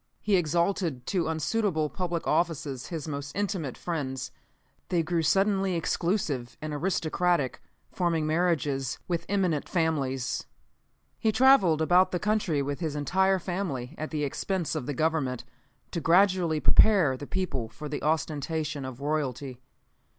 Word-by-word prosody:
He 205 -1 +2
exalted 170 -5 0
to 180 -5 0
unsuitable 160 +1 0
public 175 +1 -3
offices 155 -6 -1
his 165 -2 -5
most 145 -1 -5
intimate 190 - -2
friends. 135 -6 -3 0.6
They 170 -2 +2
grew 170 +1 0
suddenly 195 +2 +2
exclusive 165 - -1
and 155 -1 -5
aristocratic, 170 -2 0 0.3
forming 170 -4 0
marriages 155 -5 0
with 170 -2 -2
eminent 185 -7 0
families. 140 -7 -1 0.7
"He 220 - +2
traveled 210 - +5
about 180 +3 +5
the 180 - -1
country 185 -7 0
with 140 0 -3
his 160 -4 -2
entire 190 +6 +2
family, 175 -9 -3
at 155 - -5
the 150 -2 -2
expense 170 +4 -2
of 125 - -3
the 145 - -2
Government, 155 -5 0 0.5
to 170 - -3
gradually 175 -2 +3
prepare 180 -7 +5
the 145 +2 -8
people 150 -12 -2
for 150 +7 -8
the 145 - -4
ostentation 155 -1 -1
of 130 0 -8
royalty. 140 -3 -2
160 Hz, 135 wpm, -28 LUFS, 145-180 Hz, 0.7 s, traveled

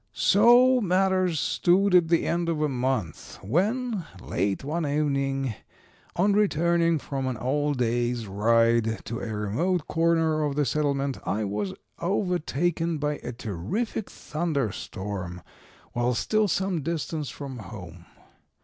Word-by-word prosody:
"So 245 +5 +5
matters 185 -3 +2
stood 190 +6 +2
at 175 -2 +6
the 165 0 +2
end 170 0 0
of 165 -2 -1
a 150 - +2
month, 125 - -2
when, 205 - 0 0.2
late 100 +3 -2
one 160 +4 -2
evening, 140 -3 0 0.6
on 200 +4 +3
returning 170 -4 +2
from 135 -2 -4
an 130 -2 -2
all 145 +5 0
day's 120 -1 0
ride 115 +2 +2
to 115 +3 -4
a - - -5
remote 120 - -1
corner 165 -1 +2
of 145 -2 -1
the 145 0 +2
settlement 140 0 0
I 110 +2 -1
was 100 -1 -3 0.2
overtaken 175 -3 0
by 150 0 -1
a - - -6
terrific 120 - -3
thunder 150 - -2
storm 95 -4 -6 0.5
while 120 +1 +1
still 215 - +1
some 190 -2 0
distance 155 -2 -3
from 135 -2 -7
home. 90 -5 -10
145 Hz, 130 wpm, -26 LUFS, 115-175 Hz, 0.6 s, at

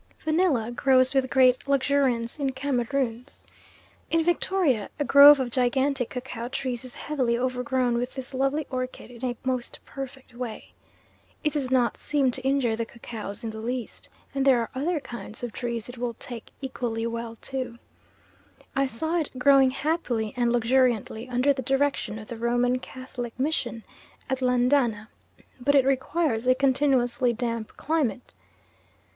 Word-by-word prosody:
Vanilla 310 -8 +2
grows 255 +1 +3
with 265 -1 +2
great 255 -1 +4
luxuriance 270 -3 +1
in 275 -2 0
Cameroons. 260 -1 -2 0.6
In 330 0 +2
Victoria 345 - +1
a 290 - -1
grove 285 +1 +9
of 250 -2 -2
gigantic 260 +1 +1
cacao 245 -2 -5
trees 255 -2 -3
is 255 - -9
heavily 255 -6 -1
overgrown 250 0 0
with 250 +1 -4
this 265 0 -7
lovely 275 +3 0
orchid 255 -1 -4
in 240 +1 -12
a 245 -2 -1
most 255 -2 -2
perfect 270 -2 -8
way. 240 -2 -7 0.7
It 300 - +1
does 280 -4 -1
not 250 -2 +2
seem 280 -4 +1
to 260 - -5
injure 265 -4 +1
the 230 - -2
cacaos 220 -3 -8
in 225 - -3
the 220 - -8
least, 240 +1 -5 0.2
and 275 -1 0
there 265 -2 +5
are 230 - -3
other 305 +5 -1
kinds 240 -4 -8
of 240 - -3
trees 235 -1 -4
it 245 -1 -10
will 240 -1 -2
take 240 -1 -8
equally 240 -4 -3
well 230 0 -4 0.2
to. 255 -3 -3 1.0
I 275 0 +2
saw 320 +8 -1
it 310 - -2
growing 270 0 +6
happily 260 -6 -1
and 240 -1 +1
luxuriantly 240 -1 +1
under 255 +3 +3
the 265 - -4
direction 270 -3 0
of 215 -1 -9
the 235 - -7
Roman 245 +2 +1
Catholic 250 -2 -7
Mission 260 -5 -1 0.5
at 265 - 0
Landana; 250 -3 +2 0.5
but 285 +3 +2
it 270 -2 +5
requires 265 -2 0
a 255 - +5
continuously 255 -2 +2
damp 230 -2 -4
climate. 280 -6 -1
255 Hz, 155 wpm, -26 LUFS, 240-275 Hz, 1.0 s, grove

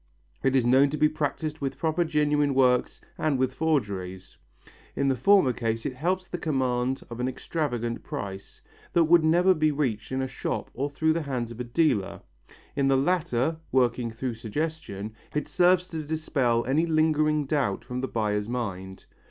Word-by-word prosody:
It 135 0 +2
is 130 -3 +3
known 130 +3 +5
to 150 - -3
be 155 - +5
practised 155 0 -3
with 135 -1 -3
both 165 +1 +1
genuine 150 -2 +1
works 125 -2 +2 0.2
and 155 -3 +1
with 130 0 0
forgeries. 100 - -2 0.6
In 140 0 +1
the 135 - +2
former 190 - +4
case 115 -1 -2
it 135 - -2
helps 180 +7 -1
the 175 - -5
command 130 -3 0
of 120 - -6
an 125 - 0
extravagant 125 -4 -3
price, 95 -1 -7 0.3
that 170 - +5
would 165 +1 +5
never 175 +4 +4
be 155 -2 +2
reached 130 -8 -2
in 130 0 -1
a - - -2
shop - - -4
or 140 +4 -2
through 160 +2 +1
the 165 - -1
hands 125 -5 -3
of 115 - -10
a - - -2
dealer; 120 - 0 0.5
in 140 -1 +2
the 135 0 +4
latter, 150 -1 +1
working 125 -2 +2
through 120 +2 -4
suggestion, 110 -3 -4 0.2
it 150 - -1
serves 180 0 +3
to 160 -2 -4
dispel 145 -6 0
any 150 +7 +1
lingering 155 -1 +2
doubt 130 -7 -1
from 125 0 -4
the 130 - -2
buyer's 105 -2 -1
mind. 95 -6 -5
135 Hz, 175 wpm, -26 LUFS, 120-155 Hz, 0.6 s, known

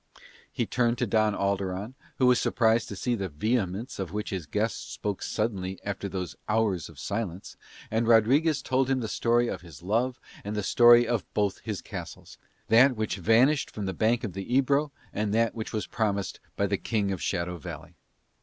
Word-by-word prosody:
He - - -1
turned 120 -1 +1
to 125 - 0
Don 110 -1 +2
Alderon, 100 +2 -2 0.2
who 130 - +3
was 125 -1 +5
surprised 115 -1 +2
to 100 - -5
see 120 +6 -1
the 100 -5 -2
vehemence 105 - -2
with 95 -4 -3
which 105 +1 -3
his 90 -6 -4
guest 105 +6 -3 0.2
suddenly 95 -4 -2
spoke - - -15
after 100 0 -3
those 90 -1 -4
hours 105 -6 +1
of - - -15
silence, 100 -4 -4 0.4
and 115 +1 +1
Rodriguez 130 +6 +4
told 130 0 +1
him 135 -1 +2
the 115 - -3
story 120 +2 +2
of 95 -7 -4
his 85 -3 -13
love 120 +7 0 0.2
and 105 +1 -4
the 105 - -1
story 120 +3 +6
of 120 -3 -2
both 105 -2 +1
his - - -5
castles, - - -9 0.3
that 125 +4 +6
which 110 -1 -2
had 95 - -6
vanished 130 +7 +4
from 105 - -5
the 95 - -2
bank 115 +4 +1
of 105 -6 -4
the 95 +4 -6
Ebro 140 +2 +2 0.2
and 105 0 -1
that 115 0 +2
which 110 -1 -5
was 110 - -2
promised 100 -3 -1
him - - -35
by - - +1
the - - 0
King 105 -3 -1
of 95 - -4
Shadow 85 +1 -2
Valley. - - -8
110 Hz, 200 wpm, -27 LUFS, 100-120 Hz, 0.4 s, story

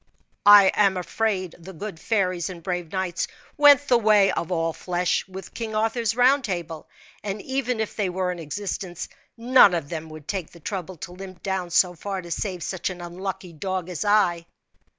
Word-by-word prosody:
"I 205 -2 +9
am 195 -3 +3
afraid 185 -1 -1
the 185 +3 -10
good 185 0 -7
fairies 185 -5 0
and 175 -3 -9
brave 175 -2 -3
knights 185 -2 -2 0.3
went 290 -2 +6
the 245 -3 +4
way 210 -3 +5
of 170 - -3
all 165 -2 0
flesh 180 0 -1
with 190 0 -9
King 225 -2 -5
Arthur's 225 +1 0
round 260 +3 +4
table; 170 -7 -5 0.3
and 205 0 -3
even 260 -3 -2
if 220 - -3
they 200 -4 0
were 180 0 -1
in 175 - -6
existence, 175 +2 -5 0.3
none 235 -5 +6
of 160 -4 -3
them 160 -1 -5
would 155 -1 -11
take 190 -5 -3
the 170 - -14
trouble 185 +1 -5
to 170 - -8
limp 185 0 -10
down 190 -3 -2
so 180 +1 +3
far 190 +2 -5
to 170 - -10
save 180 -2 -3
such 185 -1 -3
an 180 -1 -7
unlucky 180 +1 -6
dog 185 +2 -3
as 180 +1 -3
I." 185 -5 +2
185 Hz, 190 wpm, -24 LUFS, 175-210 Hz, 0.3 s, I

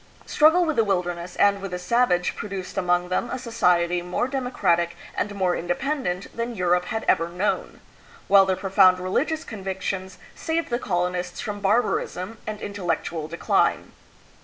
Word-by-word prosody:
Struggle 320 +4 +4
with 315 -2 -1
the 225 - +5
wilderness 180 -3 -2
and 200 -1 +3
with 195 - -5
the 180 - -4
savage 180 -1 +1
pro 210 - -6
duced 190 -2 -6
among 180 -2 +1
them 210 +6 -1
a - - -3
society 180 -8 +1
more 180 +7 -1
democratic 195 -11 0 0.2
and 205 0 -2
more 185 -2 +1
independent 180 - -2
than 235 +1 -3
Europe 180 -1 +1
had 220 +4 -3
ever 165 +1 +2
known; 185 +4 -2 0.5
while 195 -1 +6
their 190 - +2
profound 185 -1 +4
religious 290 - -1
convictions 190 -2 -5 0.2
saved 325 -3 -2
the 240 - 0
colonists 180 -3 -2
from 210 -3 -4
barbarism 205 -1 0
and 215 -1 -5
intellectual 170 -5 -3
decline. 170 +2 0
190 Hz, 155 wpm, -24 LUFS, 180-225 Hz, 0.5 s, while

